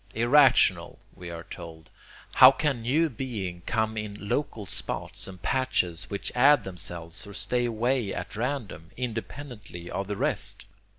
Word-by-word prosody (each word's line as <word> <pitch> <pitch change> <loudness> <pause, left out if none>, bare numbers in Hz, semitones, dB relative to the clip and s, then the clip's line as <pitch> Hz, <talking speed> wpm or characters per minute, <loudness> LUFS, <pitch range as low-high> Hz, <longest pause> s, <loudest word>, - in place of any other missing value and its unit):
Irrational! 130 +5 +4 0.2
we 90 -1 -9
are 85 -1 -7
told. 80 -3 -10 0.4
How 130 - +10
can 135 -3 0
new 145 +8 +2
being 110 - -5
come 110 0 0
in 105 -1 -5
local 115 -7 -1
spots - - -5
and 95 -1 -10
patches 90 -7 0
which 100 - -3
add 140 +4 +6
themselves 85 -1 -6
or 100 - -10
stay 120 +2 0
away 120 -1 0
at - - -5
random, 110 - -3
independently 115 -6 -6
of 95 0 -3
the 105 -1 -3
rest? - - -1
110 Hz, 140 wpm, -27 LUFS, 90-130 Hz, 0.4 s, How